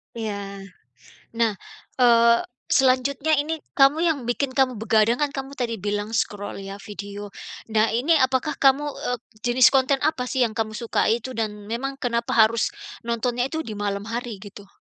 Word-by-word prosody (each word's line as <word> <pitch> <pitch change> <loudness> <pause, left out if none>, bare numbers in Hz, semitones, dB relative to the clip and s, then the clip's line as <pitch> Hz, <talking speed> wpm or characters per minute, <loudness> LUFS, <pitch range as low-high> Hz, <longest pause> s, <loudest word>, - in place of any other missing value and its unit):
Iya. 220 -2 -3 1.1
Nah, 225 -2 +2 0.5
eee, 235 -1 +6 0.3
selanjutnya 270 +3 +2
ini 315 +1 -2 0.2
kamu 275 +3 +6
yang 325 -4 +2
bikin 260 +3 -1
kamu 260 -2 +3
begadang, 220 +3 +2
kan, 290 - +1
kamu 270 0 -6
tadi 235 -5 -3
bilang 205 +2 -2
scroll 205 -3 -2
ya, 195 +1 -8
video. 205 0 -8 0.4
Nah 215 0 +3
ini 300 +7 +3
apakah 260 +3 +1
kamu 275 +1 +4
eee, 245 -3 -3 0.3
jenis 245 0 +6
konten 270 0 +2
apa, 275 -5 0
sih, 260 0 0
yang 230 - +2
kamu 220 -1 -1
sukai 230 0 0
itu? 260 - -6
Dan 210 -3 -4
memang 270 +4 -3
kenapa 235 -3 -2
harus 225 0 +3 0.3
nontonnya 240 +1 0
itu 320 +3 -3
di 220 -6 -7
malam 200 -1 -2
hari 230 -2 -5
gitu? 205 -1 -11
235 Hz, 160 wpm, -24 LUFS, 215-270 Hz, 1.1 s, eee